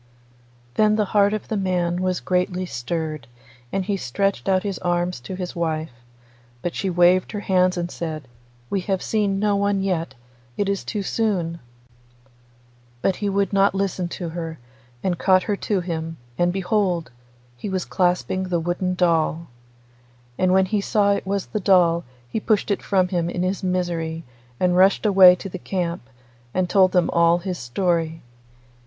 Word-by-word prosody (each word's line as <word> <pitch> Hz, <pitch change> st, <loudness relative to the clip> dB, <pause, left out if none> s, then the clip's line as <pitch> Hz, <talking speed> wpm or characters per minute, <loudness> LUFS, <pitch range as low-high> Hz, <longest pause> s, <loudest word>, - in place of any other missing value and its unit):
Then 215 Hz, 0 st, +3 dB
the 215 Hz, -1 st, +1 dB
heart 205 Hz, -1 st, +4 dB
of 215 Hz, -1 st, -3 dB
the 220 Hz, -, -2 dB
man 180 Hz, -3 st, 0 dB
was 185 Hz, -1 st, 0 dB
greatly 180 Hz, 0 st, 0 dB
stirred, 155 Hz, -1 st, -4 dB, 0.4 s
and 195 Hz, -1 st, -1 dB
he 200 Hz, 0 st, -1 dB
stretched 190 Hz, +1 st, -1 dB
out 185 Hz, -1 st, +2 dB
his 200 Hz, -3 st, -3 dB
arms 175 Hz, -2 st, -1 dB
to 155 Hz, +10 st, -7 dB
his 180 Hz, -1 st, -5 dB
wife, 160 Hz, -3 st, -2 dB, 0.7 s
but 175 Hz, -, -2 dB
she 195 Hz, -, -2 dB
waved 180 Hz, +3 st, +3 dB
her 205 Hz, -, -3 dB
hands 185 Hz, -2 st, +2 dB
and 175 Hz, 0 st, -3 dB
said, 155 Hz, -4 st, -5 dB, 0.4 s
'We 195 Hz, -, +1 dB
have 190 Hz, -1 st, 0 dB
seen 205 Hz, -3 st, 0 dB
no 205 Hz, 0 st, +2 dB
one 200 Hz, -1 st, +1 dB
yet; 165 Hz, -7 st, -2 dB, 0.4 s
it 205 Hz, -, 0 dB
is 200 Hz, -1 st, -1 dB
too 205 Hz, -2 st, -3 dB
soon.' 180 Hz, -6 st, -1 dB, 1.4 s
But 190 Hz, -, +1 dB
he 205 Hz, -, -1 dB
would 200 Hz, +1 st, 0 dB
not 195 Hz, 0 st, +3 dB
listen 195 Hz, -2 st, -1 dB
to 175 Hz, 0 st, -5 dB
her, 165 Hz, -1 st, -5 dB, 0.5 s
and 180 Hz, -3 st, -1 dB
caught 185 Hz, -1 st, +4 dB
her 205 Hz, -, -1 dB
to 200 Hz, -2 st, -1 dB
him, 165 Hz, -2 st, -4 dB, 0.2 s
and 175 Hz, +4 st, +2 dB
behold! 185 Hz, -, 0 dB, 0.4 s
he 200 Hz, -, -6 dB
was 185 Hz, -2 st, -2 dB
clasping 185 Hz, 0 st, 0 dB
the 180 Hz, -2 st, 0 dB
wooden 175 Hz, +2 st, -1 dB
doll. 165 Hz, -2 st, +1 dB, 0.9 s
And 185 Hz, +6 st, +2 dB
when 190 Hz, 0 st, +4 dB
he 205 Hz, +2 st, 0 dB
saw 200 Hz, -1 st, +2 dB
it 200 Hz, -, -3 dB
was 200 Hz, 0 st, -1 dB
the 215 Hz, -, -3 dB
doll 175 Hz, -3 st, +3 dB, 0.2 s
he 220 Hz, -, -2 dB
pushed 215 Hz, -1 st, +1 dB
it 200 Hz, -, 0 dB
from 185 Hz, -2 st, +1 dB
him 175 Hz, -2 st, 0 dB
in 175 Hz, 0 st, -2 dB
his 185 Hz, +2 st, -1 dB
misery 170 Hz, -3 st, -2 dB, 0.4 s
and 180 Hz, -1 st, +2 dB
rushed 190 Hz, +4 st, +4 dB
away 190 Hz, -3 st, +8 dB
to 180 Hz, -, -7 dB
the 185 Hz, -1 st, -7 dB
camp, 175 Hz, -2 st, -2 dB, 0.5 s
and 185 Hz, -1 st, +1 dB
told 185 Hz, 0 st, +4 dB
them 180 Hz, -2 st, +2 dB
all 170 Hz, 0 st, +4 dB
his 180 Hz, 0 st, -4 dB
story. 165 Hz, +4 st, -1 dB
185 Hz, 175 wpm, -23 LUFS, 170-195 Hz, 1.4 s, away